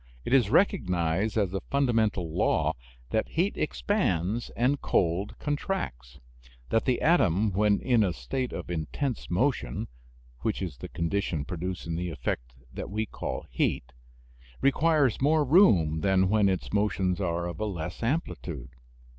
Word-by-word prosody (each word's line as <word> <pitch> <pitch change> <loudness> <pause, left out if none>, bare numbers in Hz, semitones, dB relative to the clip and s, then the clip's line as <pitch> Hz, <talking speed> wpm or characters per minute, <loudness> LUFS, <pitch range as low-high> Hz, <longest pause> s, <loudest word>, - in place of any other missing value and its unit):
It - - -1
is 125 -7 +5
recognized 95 - +1
as 100 -4 +1
a 95 - -2
fundamental 110 - +1
law - - +2 0.4
that 110 - +1
heat 180 +5 0
expands 115 - 0
and 130 +4 +2
cold 90 +3 0
contracts; 65 - -3 0.5
that 115 - +1
the 125 - +2
atom 110 - +3
when 100 +2 +2
in 120 -4 +3
a 95 - +1
state 130 +8 -3
of - - -6
intense 95 - -3
motion 125 +9 0 0.5
(which 110 - -1
is 85 -9 -4
the - - -7
condition 85 -3 -1
producing 85 -1 -4
the 90 +1 -2
effect 60 -4 -4 0.2
that - - -6
we 110 +2 -1
call - - -5
"heat") - - -1 0.7
requires 140 -3 +3
more 150 +2 +3
room 95 - +5
than 95 +1 +3
when 105 -1 +4
its 95 +1 -3
motions 100 -3 +1
are 85 -2 -1
of 85 - -6
a 110 - -1
less 90 -2 -5
amplitude. 105 - -3
100 Hz, 145 wpm, -28 LUFS, 85-125 Hz, 0.7 s, is